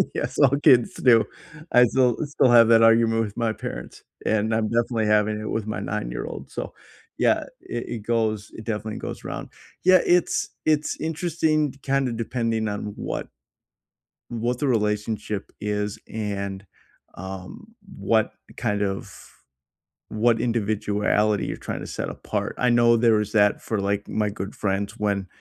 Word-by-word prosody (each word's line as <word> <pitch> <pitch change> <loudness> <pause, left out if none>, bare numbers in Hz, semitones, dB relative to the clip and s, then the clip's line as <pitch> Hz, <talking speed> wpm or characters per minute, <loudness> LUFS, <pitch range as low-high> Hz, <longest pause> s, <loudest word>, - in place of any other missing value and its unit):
yes, - - -3
all 140 -1 +5
kids 120 -2 +5
do. 115 -3 +5 0.5
I 125 - +7
still 125 0 +2
still 145 -3 +2
have 115 -2 +7
that 115 -1 +6
argument 115 0 +4
with 105 +2 -9
my 115 -2 0
parents, - - -7 0.2
and 110 +1 +1
I'm 110 -1 +1
definitely 115 -1 0
having 105 0 +2
it 110 - -5
with 110 -1 -2
my 110 - -3
nine-year-old, - - -4
so - - -6 0.5
yeah, - - +4
i - - -8 0.2
it 120 -2 -5
goes 110 -3 0
it 110 - -9
definitely 110 -1 -4
goes - - -6
around. - - -5 0.3
Yeah, 185 0 +7
it's 175 -1 +2 0.2
it's 155 -1 +1
interesting 160 -2 0
kinda 135 -2 +1
depending 115 -1 -1
on 105 0 -4
what - - -4 1.0
what 120 +1 -2
the 145 - 0
relationship 105 -2 -1
is 105 0 -2
and, 100 -2 -4 0.5
um, 95 - -8 0.3
what 110 -1 +1 0.2
kind 105 -4 -1
of 95 -1 -5 0.8
what 115 +1 +2
individuality 105 -2 +1
you're - - -4
trying - - -5
to - - -6
set - - -4
apart. - - -3
I 125 - +3
know 120 -1 +5
there 115 -2 +4
is 105 0 -3
that 105 -1 +3
for, 110 -3 -2
like, 100 +1 -1
my 105 -1 0
good 100 -1 -6
friends 100 0 -1
when 100 -2 0
110 Hz, 155 wpm, -24 LUFS, 105-120 Hz, 1.0 s, I